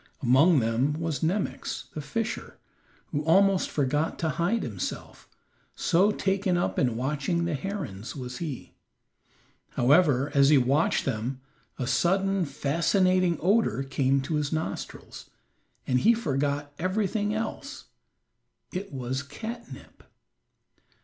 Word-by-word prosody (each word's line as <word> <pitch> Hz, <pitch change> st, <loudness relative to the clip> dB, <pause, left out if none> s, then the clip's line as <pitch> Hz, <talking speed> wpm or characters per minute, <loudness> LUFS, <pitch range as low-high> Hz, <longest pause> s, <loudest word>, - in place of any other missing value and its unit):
Among 135 Hz, +5 st, +5 dB
them 115 Hz, +6 st, +1 dB
was 155 Hz, -3 st, -3 dB
Nemox, 185 Hz, +5 st, -2 dB
the 155 Hz, -, -4 dB
fisher, 225 Hz, +9 st, -4 dB, 0.5 s
who 145 Hz, 0 st, -1 dB
almost 190 Hz, +4 st, +4 dB
forgot 145 Hz, +2 st, 0 dB
to 160 Hz, -, -1 dB
hide 175 Hz, -, 0 dB
himself, 100 Hz, -6 st, -6 dB, 0.5 s
so 190 Hz, +5 st, +3 dB
taken 190 Hz, -2 st, 0 dB
up 175 Hz, -, -1 dB
in 120 Hz, -4 st, +1 dB
watching 150 Hz, +6 st, -1 dB
the 170 Hz, -, -1 dB
herons 145 Hz, -, -5 dB
was 125 Hz, -2 st, -6 dB
he. 155 Hz, -7 st, -6 dB, 1.0 s
However, 145 Hz, 0 st, +3 dB
as 140 Hz, -1 st, +5 dB
he 150 Hz, -, +6 dB
watched 135 Hz, +5 st, +2 dB
them 125 Hz, +1 st, -2 dB, 0.4 s
a 125 Hz, -, -2 dB
sudden, 190 Hz, +7 st, +1 dB
fascinating 170 Hz, +5 st, +1 dB
odor 200 Hz, -, +2 dB
came 135 Hz, 0 st, +1 dB
to 150 Hz, +3 st, -2 dB
his 150 Hz, -1 st, -1 dB
nostrils, 160 Hz, 0 st, -5 dB, 0.6 s
and 125 Hz, -1 st, +2 dB
he 230 Hz, -, +5 dB
forgot 145 Hz, -6 st, -2 dB
everything 205 Hz, +3 st, 0 dB
else 225 Hz, +6 st, -5 dB, 0.9 s
it 195 Hz, +2 st, -5 dB
was 130 Hz, 0 st, -3 dB
catnip. 230 Hz, -, -9 dB
155 Hz, 120 wpm, -27 LUFS, 135-190 Hz, 1.0 s, he